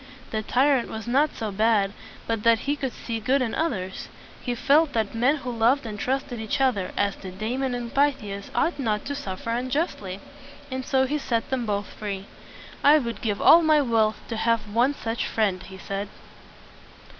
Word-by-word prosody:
The 220 Hz, -, -1 dB
tyrant 260 Hz, +3 st, +2 dB
was 220 Hz, -1 st, -6 dB
not 275 Hz, +5 st, +2 dB
so 220 Hz, -3 st, -3 dB
bad 205 Hz, -1 st, +2 dB, 0.3 s
but 225 Hz, -2 st, -1 dB
that 230 Hz, 0 st, +4 dB
he 285 Hz, +1 st, 0 dB
could 270 Hz, -3 st, -3 dB
see 230 Hz, -1 st, -5 dB
good 255 Hz, +6 st, +2 dB
in 245 Hz, -4 st, -1 dB
others. 190 Hz, -, -2 dB, 0.3 s
He 245 Hz, -2 st, -2 dB
felt 285 Hz, +5 st, +3 dB
that 220 Hz, -3 st, 0 dB
men 245 Hz, +6 st, +3 dB
who 265 Hz, -4 st, -5 dB
loved 240 Hz, +4 st, +3 dB
and 210 Hz, -2 st, -6 dB
trusted 260 Hz, -1 st, -2 dB
each 220 Hz, +2 st, -2 dB
other, 235 Hz, -9 st, +1 dB
as 200 Hz, -1 st, +1 dB
did 185 Hz, -1 st, -9 dB
Damon 250 Hz, +4 st, -1 dB
and 240 Hz, -1 st, -5 dB
Pythias, 260 Hz, -9 st, 0 dB
ought 335 Hz, -, +1 dB
not 215 Hz, -5 st, -1 dB
to 285 Hz, -, -3 dB
suffer 230 Hz, -6 st, -5 dB
un 245 Hz, +2 st, -1 dB
just 305 Hz, +2 st, -1 dB
ly. 190 Hz, -1 st, -6 dB, 0.5 s
And 260 Hz, 0 st, -3 dB
so 265 Hz, 0 st, +2 dB
he 295 Hz, +3 st, -1 dB
set 230 Hz, -4 st, -2 dB
them 250 Hz, -3 st, -1 dB
both 205 Hz, -1 st, -1 dB
free. 200 Hz, -2 st, -5 dB, 0.6 s
"I 295 Hz, +2 st, +8 dB
would 235 Hz, -5 st, -3 dB
give 210 Hz, -3 st, -1 dB
all 335 Hz, -, +8 dB
my 310 Hz, -2 st, +4 dB
wealth 225 Hz, -5 st, +2 dB
to 225 Hz, -, -3 dB
have 230 Hz, 0 st, +2 dB
one 250 Hz, +5 st, +3 dB
such 230 Hz, -2 st, -3 dB
friend," 200 Hz, -5 st, 0 dB
he 190 Hz, 0 st, -10 dB
said. 195 Hz, +1 st, -4 dB
235 Hz, 195 wpm, -25 LUFS, 215-270 Hz, 0.6 s, I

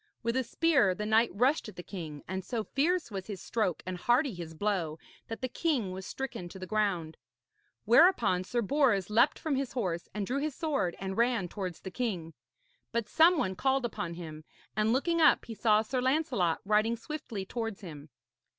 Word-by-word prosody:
With 230 Hz, +1 st, 0 dB
a 260 Hz, -, +2 dB
spear 255 Hz, -, +3 dB
the 210 Hz, -, -4 dB
knight 220 Hz, +2 st, +4 dB
rushed 250 Hz, -, +1 dB
at 210 Hz, -, -13 dB
the 175 Hz, -, -8 dB
king, 160 Hz, -7 st, -7 dB
and 190 Hz, 0 st, -3 dB
so 230 Hz, +2 st, -3 dB
fierce 315 Hz, +4 st, 0 dB
was 190 Hz, -2 st, -5 dB
his 205 Hz, -4 st, -5 dB
stroke 210 Hz, -5 st, -1 dB
and 185 Hz, 0 st, -4 dB
hardy 245 Hz, -, +2 dB
his 170 Hz, -2 st, -8 dB
blow 175 Hz, -5 st, -1 dB, 0.3 s
that 225 Hz, -, -6 dB
the 255 Hz, -, 0 dB
king 255 Hz, -, -1 dB
was 185 Hz, 0 st, -6 dB
stricken 265 Hz, -10 st, -5 dB
to 190 Hz, -, -10 dB
the 185 Hz, -, -6 dB
ground. 185 Hz, -6 st, -1 dB, 0.7 s
Whereupon 230 Hz, -, +5 dB
Sir 235 Hz, +5 st, -1 dB
Bors 210 Hz, -6 st, +2 dB
leapt 235 Hz, +6 st, +4 dB
from 310 Hz, -3 st, -1 dB
his 270 Hz, -2 st, -3 dB
horse 180 Hz, -9 st, -2 dB
and 210 Hz, -1 st, -3 dB
drew 260 Hz, +7 st, -1 dB
his 295 Hz, -1 st, -2 dB
sword 290 Hz, -, -1 dB
and 190 Hz, 0 st, -4 dB
ran 235 Hz, -6 st, +2 dB
towards 185 Hz, -4 st, -5 dB
the 190 Hz, -, -7 dB
king. 180 Hz, -9 st, -3 dB, 0.6 s
But 235 Hz, -2 st, -1 dB
some 335 Hz, +2 st, +5 dB
one 190 Hz, -8 st, 0 dB
called 265 Hz, +3 st, +1 dB
upon 170 Hz, -7 st, -4 dB
him, 155 Hz, -3 st, -8 dB, 0.3 s
and 215 Hz, +1 st, +2 dB
looking 335 Hz, +7 st, +1 dB
up 310 Hz, -, +5 dB
he 230 Hz, -, -6 dB
saw 215 Hz, -1 st, +3 dB
Sir 250 Hz, +3 st, -2 dB
Lancelot 255 Hz, -, +1 dB
riding 215 Hz, +3 st, +2 dB
swiftly 230 Hz, -6 st, -6 dB
towards 225 Hz, -1 st, -4 dB
him. 155 Hz, -5 st, -9 dB
215 Hz, 195 wpm, -30 LUFS, 185-255 Hz, 0.7 s, Whereupon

